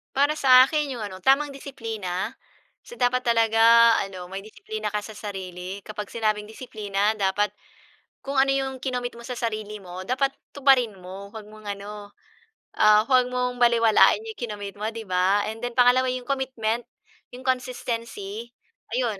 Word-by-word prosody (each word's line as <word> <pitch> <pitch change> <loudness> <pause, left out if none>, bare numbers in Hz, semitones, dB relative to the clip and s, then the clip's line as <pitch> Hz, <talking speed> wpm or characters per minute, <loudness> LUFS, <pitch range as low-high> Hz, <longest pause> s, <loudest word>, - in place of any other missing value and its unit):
Para 285 +3 +3
sa 255 -2 +7
akin, 300 -2 -1
yung 245 - -6
ano, 190 -3 -7
tamang 275 +2 +4
disiplina. 225 -7 -5 0.5
So, 480 - -13
dapat 250 +1 +2
talaga 230 0 +5
ano, 185 -2 -8
may 195 +1 -7
disiplina 215 -1 -6
ka 210 - 0
sa 210 +1 -10
sarili. 190 -2 -6
Kapag 210 +1 -6
sinabing 215 -2 0
disiplina, 215 -2 -2
dapat 205 +1 +1 0.7
kung 275 0 -4
ano 270 0 +4
yung 265 -1 -2
kinomit 250 -2 -4
mo 235 - -10
sa 250 - -4
sarili 215 -3 -4
mo, 185 0 -8
dapat 260 +5 +1 0.2
tuparin 265 -5 +3
mo. 195 +2 -10
'Wag 215 -2 -9
mong 215 0 -14
ano, 205 0 -9 0.6
ah, 215 0 +6
huwag 255 -1 +4
mong 250 0 -1
balewalain 235 - +5
yung 445 - -6
ikinomit 205 -4 -6
mo, 210 - -3
'di 225 -1 -7
ba? 185 +3 +3
And 220 - -6
then, 245 - -4
pangalawa 250 +1 +5
yung 250 -1 -5
commitment, 240 -4 -1 0.5
yung 250 +1 -9
consistency, 235 -4 -3 0.4
ayun 235 -5 -1
225 Hz, 160 wpm, -25 LUFS, 205-255 Hz, 0.7 s, sa